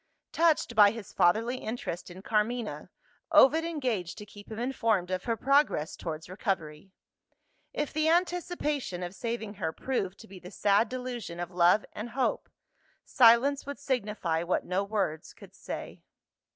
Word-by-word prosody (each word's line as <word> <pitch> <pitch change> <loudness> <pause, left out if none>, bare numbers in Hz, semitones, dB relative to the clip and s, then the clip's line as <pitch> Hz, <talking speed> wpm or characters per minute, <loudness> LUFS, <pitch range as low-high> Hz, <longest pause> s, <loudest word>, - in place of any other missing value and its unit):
Touched 330 -2 +2
by 205 -1 +8
his 225 -1 -8
fatherly 225 +8 +2
interest 220 -8 -5
in 185 +2 -11
Carmina, 220 +2 -1 0.4
Ovid 310 +1 +6
engaged 250 - -2
to 210 - -8
keep 205 0 -14
him 220 - -6
informed 225 -7 0
of 185 -1 -2
her 230 -1 0
progress 275 - +2
towards 160 -1 -6
recovery. 185 -3 -4 0.8
If 295 - -3
the 310 +1 +2
anticipation 330 - -1
of 175 +1 -5
saving 225 0 -4
her 160 - 0
proved 200 -2 -3
to 225 - -14
be 195 -2 -11
the 180 - -11
sad 205 +2 +2
delusion 245 -9 -5
of 175 +1 -4
love 180 +4 +4
and 220 +3 -6
hope, 255 +2 -1 0.6
silence 260 +4 +5
would 285 - -5
signify 210 -11 -1
what 175 +2 -1
no 185 +2 0
words 195 -7 -3
could - - -15
say. - - -7
215 Hz, 150 wpm, -29 LUFS, 185-260 Hz, 0.8 s, by